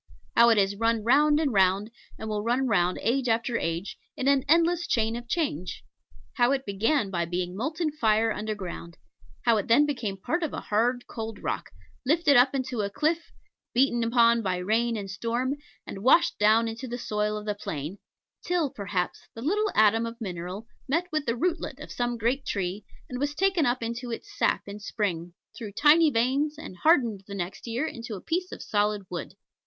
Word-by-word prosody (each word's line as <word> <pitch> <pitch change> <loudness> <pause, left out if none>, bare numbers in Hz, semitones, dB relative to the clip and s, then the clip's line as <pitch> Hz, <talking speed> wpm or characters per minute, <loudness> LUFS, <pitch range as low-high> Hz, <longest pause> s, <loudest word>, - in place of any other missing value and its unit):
How 235 0 +7
it 225 - +4
has 200 0 +2
run 230 +1 +1
round 295 +5 +4
and 290 -6 0
round, 195 +2 +3 0.3
and 220 - -6
will 210 -1 -2
run 245 +4 +1
round 180 -6 +2
age 250 +1 +1
after 230 +1 +1
age, 165 +4 -3 0.2
in 265 - -1
an 275 -1 +4
endless 340 +2 +3
chain 225 -1 +1
of 240 0 -7
change. 235 - -2 0.5
How 245 0 +4
it 270 -1 -2
began 210 +3 +1
by 170 -2 0
being 180 +1 -3
molten 310 - -2
fire 225 -5 +2
underground, 200 -6 -5 0.5
how 230 -3 +4
then 235 +8 +4
it - - +2
became 235 -9 -3
part 330 - -2
of 320 - -2
a - - -3
hard 245 +4 0
cold 225 -2 -6
rock, - - -3 0.3
lifted 300 +1 +3
up 255 +3 +5
into 255 -4 -2
a 200 - -1
cliff, 315 +8 -1 0.4
beaten 240 -2 +3
upon 230 0 +4
by 185 -4 -1
rain 225 +5 0
and 200 -2 -5
storm, 235 +6 -1 0.3
and 195 - -7
washed 335 +7 +4
down 220 +2 +4
into 225 +3 -5
the 240 0 -4
soil 210 -2 -1
of 210 - -7
the 210 - 0
plain, 165 -2 -6 0.4
till, 345 -6 0
perhaps, 195 -3 -3
the 225 - -7
little 415 +8 +1
atom 220 +2 +4
of 230 +1 -8
mineral 185 0 -5 0.2
met 330 +6 +1
with 305 -2 -1
the 230 - +1
rootlet 325 -2 -2
of 300 - -9
some 240 -1 -2
great 240 +5 0
tree, 195 -1 -3 0.2
and 250 - -5
was 290 +1 -1
taken 375 -3 +2
up 240 0 0
into 235 +2 -4
its 410 - -7
sap - - +1
in 200 +1 -7
spring, 180 -5 -3 0.2
through 220 -5 -7
tiny 305 +8 +5
veins, 275 +5 +1
and 190 -12 -9
hardened 235 - +3
the 200 - -6
next 185 +4 -5
year 235 +6 -1
into 230 -7 -6
a - - -7
piece 360 +2 -2
of - - -7
solid 205 -1 0
wood. 175 -3 -6
230 Hz, 195 wpm, -27 LUFS, 205-275 Hz, 0.5 s, How